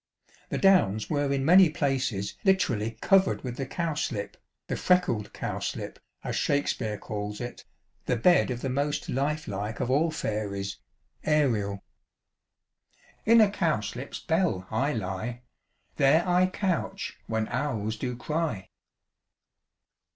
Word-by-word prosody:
The - - -2
Downs 115 - +3
were 145 -2 +1
in 135 -1 0
many 180 +2 +7
places 130 -9 -1
literally 115 - +1
covered 195 -1 +3
with 125 -2 -5
the 135 - -3
cowslip, 150 - -2 0.3
the - - -3
"freckled 180 - +1
cowslip," - - -4 0.2
as - - -3
Shakespeare 125 -6 0
calls 105 0 -5
it, 120 0 -7 0.4
the 125 - +2
bed 175 +9 +4
of 120 -1 -3
the 135 - -2
most 145 +3 -1
life 150 +4 -1
like 105 +3 -4
of 125 - -1
all 155 +5 +3
fairies, 105 -9 -3 0.4
Ariel. 115 -10 +1 0.7
" - - -35
In 230 -1 +8
a 205 -2 +5
cowslip's 140 - -2
bell 165 - 0
I 140 +3 +1
lie; 110 +4 -4 0.5
There 150 +6 +4
I 180 +1 +4
couch 185 -1 -2
when 110 -1 -1
owls 115 -5 -2
do 125 +2 -3
cry. 150 - -2
135 Hz, 130 wpm, -27 LUFS, 110-160 Hz, 0.7 s, In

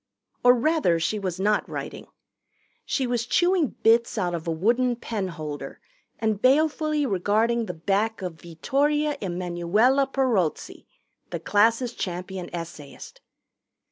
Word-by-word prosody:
Or 245 0 +7
rather 250 - +2
she 210 +6 -1
was 185 -2 -4
not 210 +2 +1
writing. - - -6 0.8
She 265 - -1
was 240 -2 -1
chewing 350 -1 +2
bits 230 +1 +3
out 175 -1 0
of 170 0 -5
a - - 0
wooden 240 +9 +1
pen 220 -4 -4
holder 155 -4 -7 0.4
and 220 -2 -1
balefully 305 +2 +2
regarding 220 +3 +1
the - - -5
back 200 +5 -1
of 165 -4 -6
Vittoria 290 - 0
Emanuella 185 +9 +1
Perozzi, 230 - -1 0.4
the - - -4
class' 230 +4 +2
champion 180 -1 -5
essayist. 165 -4 -9
215 Hz, 125 wpm, -25 LUFS, 175-255 Hz, 0.8 s, Or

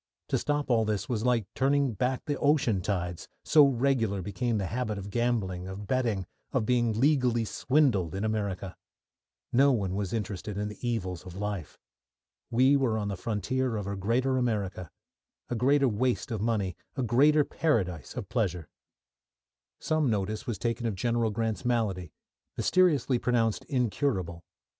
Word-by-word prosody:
To - - +1
stop 145 -2 -1
all 115 -2 +4
this 105 -3 -2
was 115 -3 -1
like 120 -4 +2
turning 140 -1 +2
back 125 +5 -1
the 145 -2 -2
ocean 140 -9 +2
tides, 90 -3 -3 0.2
so 150 -2 +7
regular 120 -7 +1
became 110 +4 -1
the 100 - -1
habit 110 +1 -2
of 100 0 -7
gambling, 105 -7 -1
of 95 +2 -7
betting, 115 -5 0 0.3
of 125 -5 0
being 120 -2 +1
legally 125 -5 +3
swindled 115 - +1
in 100 - -2
America. 100 -4 -2 0.8
No 140 +3 +5
one 100 -7 0
was 100 -1 -2
interested 105 -2 -4
in 105 +1 -2
the 105 - -10
evils 95 -7 -3
of 90 -1 -10
life. 100 -5 -4 0.7
We 130 +4 +4
were 130 -5 +1
on 105 -1 -2
the 100 - -2
frontier 115 +5 -1
of 105 - -4
a 100 0 -3
greater 120 +7 +1
America, 100 -8 -2 0.6
a - - 0
greater 135 +4 +3
waste 125 +3 0
of 110 -3 -2
money, 105 -5 0 0.2
a 130 - -1
greater 145 +6 +4
paradise 95 - -1
of - - -5
pleasure. 85 -4 -1 1.1
Some 155 -4 +1
notice 105 0 -2
was 115 - -2
taken 115 0 -1
of 110 - -2
General 115 +2 0
Grant's 110 +1 -2
malady, 105 -9 -1 0.5
mysteriously 150 -9 +3
pronounced 115 -3 +1
incurable. 110 - -1
115 Hz, 155 wpm, -28 LUFS, 100-130 Hz, 1.1 s, so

